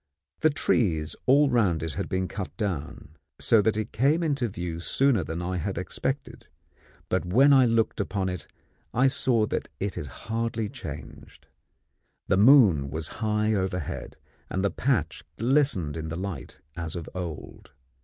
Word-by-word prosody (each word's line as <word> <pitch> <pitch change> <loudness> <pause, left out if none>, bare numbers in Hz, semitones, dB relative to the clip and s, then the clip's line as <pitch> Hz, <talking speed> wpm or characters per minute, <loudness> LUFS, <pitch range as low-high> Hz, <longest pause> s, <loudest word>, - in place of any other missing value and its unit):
The 155 - +4
trees 90 - +1
all 140 +1 +5
round 95 -10 +2
it 80 -3 -4
had - - -4
been 95 0 -1
cut 95 +3 -6
down, 80 - -4 0.2
so 115 - +4
that 110 0 +1
it 110 0 -3
came 145 +8 +2
into 140 -6 0
view 85 -3 -5
sooner 125 +3 +2
than 80 +3 -4
I 90 +1 -2
had 85 - -3
expected; - - -4 0.6
but 95 - 0
when 130 +11 +5
I 130 -2 +6
looked 115 -1 +1
upon 100 -1 -1
it 90 -4 -5 0.5
I 125 +3 +4
saw 130 -5 +2
that - - -3
it 100 -1 -2
had 75 - -5
hardly 115 - -3
changed. - - -10 0.8
The - - +3
moon 100 - +6
was 80 +2 -3
high 105 0 +1
overhead, 95 -4 -3 0.3
and 95 +1 -1
the 100 - +1
patch 95 - -1
glistened 120 - +2
in 80 -1 -4
the 80 - -4
light, 95 -1 -6 0.2
as 85 -2 -4
of 85 -3 -5
old. 85 -4 -7
100 Hz, 160 wpm, -26 LUFS, 85-120 Hz, 0.8 s, I